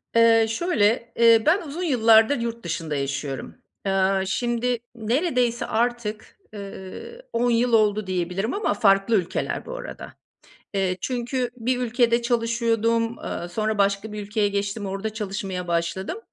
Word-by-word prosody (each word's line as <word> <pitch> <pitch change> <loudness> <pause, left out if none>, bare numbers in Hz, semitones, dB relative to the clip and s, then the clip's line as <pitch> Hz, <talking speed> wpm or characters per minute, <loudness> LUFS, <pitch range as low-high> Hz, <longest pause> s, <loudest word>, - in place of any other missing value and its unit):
Eee, 230 -1 +6
şöyle 230 - +1
eee, 230 -1 +6
ben 340 +6 +4
uzun 325 +3 -5
yıllardır 230 -3 +5
yurt 235 0 -4
dışında 160 -3 -3
yaşıyorum. 140 0 -4 0.3
Eee, 195 0 +2
şimdi 240 +3 0 0.2
neredeyse 245 +1 0
artık, 230 -2 -2 0.2
eee, 200 - -9
10 240 +1 +2
yıl 235 +1 +2
oldu 215 -2 +3
diyebilirim 185 +4 -2
ama 400 - 0
farklı 200 +1 +3
ülkeler 180 -4 -1
bu - - -6
arada. - - -8 0.6
Eee, 190 -2 0
çünkü 245 +1 -2
bir 250 +1 -1
ülkede 240 -1 +2
çalışıyordum, 230 -1 +1
eee, 175 - -4
sonra 215 +3 -1
başka 200 +2 +1
bir 210 0 -5
ülkeye 205 0 0
geçtim, 200 +1 -2
orada 195 +3 -3
çalışmaya 195 -4 -4
başladım. 170 - -2
225 Hz, 135 wpm, -24 LUFS, 195-240 Hz, 0.6 s, Eee